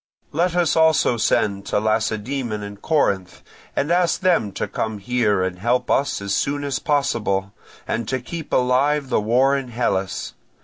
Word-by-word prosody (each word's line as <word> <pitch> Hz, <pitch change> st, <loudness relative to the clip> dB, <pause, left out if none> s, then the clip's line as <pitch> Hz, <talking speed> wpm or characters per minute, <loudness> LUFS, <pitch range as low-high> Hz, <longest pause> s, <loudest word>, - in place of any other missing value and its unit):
Let 175 Hz, +3 st, 0 dB
us 175 Hz, -3 st, +2 dB
also 160 Hz, -6 st, +4 dB
send 105 Hz, -3 st, +1 dB
to -, -, +1 dB
Lacedaemon 110 Hz, +1 st, -1 dB
and 100 Hz, 0 st, -9 dB
Corinth, 100 Hz, -, 0 dB, 0.3 s
and 145 Hz, -, 0 dB
ask 175 Hz, 0 st, +2 dB
them 170 Hz, -, +2 dB
to -, -, -3 dB
come 110 Hz, -1 st, -3 dB
here 105 Hz, -2 st, +1 dB
and 90 Hz, -1 st, -3 dB
help 125 Hz, +4 st, 0 dB
us 140 Hz, -7 st, +1 dB
as 100 Hz, 0 st, -2 dB
soon 145 Hz, +5 st, 0 dB
as 140 Hz, -2 st, -2 dB
possible, 105 Hz, -9 st, 0 dB, 0.3 s
and 115 Hz, -1 st, -2 dB
to 130 Hz, +1 st, -1 dB
keep 160 Hz, +6 st, -7 dB
alive 135 Hz, +3 st, +2 dB
the 110 Hz, -, +2 dB
war 125 Hz, +6 st, +3 dB
in 135 Hz, -2 st, -3 dB
Hellas. 100 Hz, -6 st, -2 dB
125 Hz, 165 wpm, -22 LUFS, 105-145 Hz, 0.3 s, also